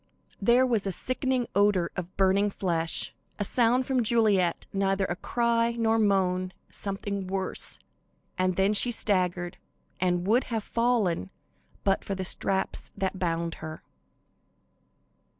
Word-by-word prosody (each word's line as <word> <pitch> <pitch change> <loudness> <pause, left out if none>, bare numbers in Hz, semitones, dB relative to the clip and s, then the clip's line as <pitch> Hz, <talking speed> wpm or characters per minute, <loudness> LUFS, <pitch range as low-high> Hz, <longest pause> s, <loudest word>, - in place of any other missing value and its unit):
There 240 +5 +5
was 225 -6 0
a - - 0
sickening 255 +4 -1
odor 200 -4 +2
of 185 0 -6
burning 195 +2 +3
flesh, 170 -4 -1 0.2
a 205 - -1
sound 245 +4 +2
from 260 -2 +1
Juliet, 210 -6 +2
neither 195 0 +1
a 175 - -2
cry 235 +3 +1
nor 225 -1 +1
moan, 185 -3 +1 0.2
something 200 -1 -3
worse, 190 0 0 0.6
and 185 0 +1
then 195 +3 +2
she 230 +4 +4
staggered 180 -6 0 0.4
and 180 -1 +1
would 230 +6 +3
have 225 -3 -3
fallen 220 - 0 0.5
but 195 0 +1
for 195 - -3
the 190 0 -4
straps 190 +2 0
that 190 -1 -2
bound 170 -1 -1
her. 155 0 -7
195 Hz, 130 wpm, -27 LUFS, 185-230 Hz, 0.6 s, There